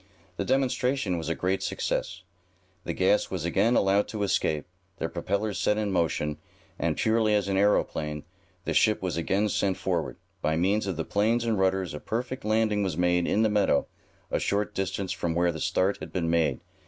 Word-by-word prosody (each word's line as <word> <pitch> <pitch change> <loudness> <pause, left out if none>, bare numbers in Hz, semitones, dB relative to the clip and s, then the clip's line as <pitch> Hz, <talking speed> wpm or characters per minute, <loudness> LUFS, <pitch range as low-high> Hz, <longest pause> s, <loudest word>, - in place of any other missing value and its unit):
The - - -2
demonstration 130 -7 +1
was 80 - -4
a 85 - 0
great 95 +1 -1
success. - - -2 0.6
The - - -2
gas 95 +3 +2
was 90 -4 -3
again 100 +7 +2
allowed 100 +1 +3
to 105 -2 -3
escape, 80 -6 0 0.3
the 80 - -2
propellers 100 +5 -2
set 105 - +2
in 105 -2 -1
motion, 80 -4 0 0.4
and - - 0
purely 110 -1 +2
as 100 -2 +1
an 100 - 0
aeroplane, 75 -6 +1 0.4
the - - -1
ship 110 -3 +3
was 90 -2 -1
again 95 +5 +1
sent 95 -2 0
forward. 90 -3 -2 0.2
By 80 +1 +1
means 100 +5 +1
of 95 -4 -2
the 80 - -2
planes 115 +4 +1
and 110 -3 +1
rudders 95 -2 +1
a 75 - -5
perfect 125 - -4
landing 110 -1 +2
was 95 -6 -1
made 90 0 +2
in 110 - +2
the - - +4
meadow, 105 -1 +2 0.5
a - - +1
short 100 +1 -1
distance 95 0 -2
from 85 -3 -2
where 85 0 +2
the 80 - -6
start 95 +2 +1
had - - -8
been 85 -3 -1
made. 85 -1 +1
95 Hz, 190 wpm, -27 LUFS, 85-105 Hz, 0.6 s, the